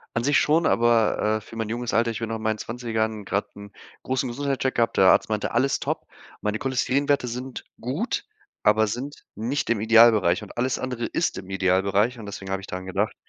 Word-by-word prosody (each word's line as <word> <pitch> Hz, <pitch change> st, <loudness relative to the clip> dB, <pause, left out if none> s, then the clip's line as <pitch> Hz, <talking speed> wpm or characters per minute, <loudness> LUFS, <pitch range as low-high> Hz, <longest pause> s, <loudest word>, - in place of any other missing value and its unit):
An 115 Hz, -, 0 dB
sich 145 Hz, 0 st, +4 dB
schon, 160 Hz, +2 st, +3 dB
aber, 115 Hz, -3 st, +3 dB
äh, -, -, -17 dB
für 115 Hz, -, -13 dB
mein 110 Hz, -1 st, -3 dB
junges 120 Hz, +1 st, -3 dB
Alter 115 Hz, +1 st, +2 dB
ich 110 Hz, -, -5 dB
bin 115 Hz, -, -3 dB
noch 115 Hz, -, -2 dB
in 110 Hz, -, -6 dB
meinen 110 Hz, -1 st, 0 dB
20ern 110 Hz, -3 st, -3 dB
grad 100 Hz, +1 st, -3 dB
'n 100 Hz, 0 st, -11 dB, 0.3 s
großen 130 Hz, 0 st, -1 dB
Gesundheitscheck 135 Hz, +1 st, -2 dB
gehabt. 115 Hz, -1 st, +1 dB
Der 95 Hz, -, +6 dB
Arzt -, -, +5 dB
meinte: 105 Hz, -1 st, -1 dB
„Alles 130 Hz, +4 st, +1 dB
top!” -, -, -3 dB, 0.4 s
Meine 105 Hz, +1 st, -1 dB
Cholesterinwerte 135 Hz, +1 st, +1 dB
sind 125 Hz, +2 st, -6 dB, 0.2 s
gut, 140 Hz, -, -2 dB, 0.4 s
aber 110 Hz, +1 st, +4 dB
sind 125 Hz, +7 st, -5 dB
nicht 120 Hz, +6 st, -2 dB
im 115 Hz, -3 st, +2 dB
Idealbereich, 110 Hz, -4 st, +5 dB
und 105 Hz, -, -12 dB
alles 125 Hz, +1 st, 0 dB
andere 125 Hz, -2 st, -3 dB
ist 165 Hz, -, -1 dB
im 95 Hz, 0 st, -8 dB
Idealbereich, 95 Hz, +5 st, +1 dB
und 110 Hz, -, -8 dB
deswegen 95 Hz, -1 st, -7 dB
habe 95 Hz, -, -1 dB
ich 95 Hz, -, -11 dB
daran 95 Hz, 0 st, -6 dB
gedacht. 95 Hz, -, -1 dB
115 Hz, 210 wpm, -24 LUFS, 105-125 Hz, 0.4 s, Der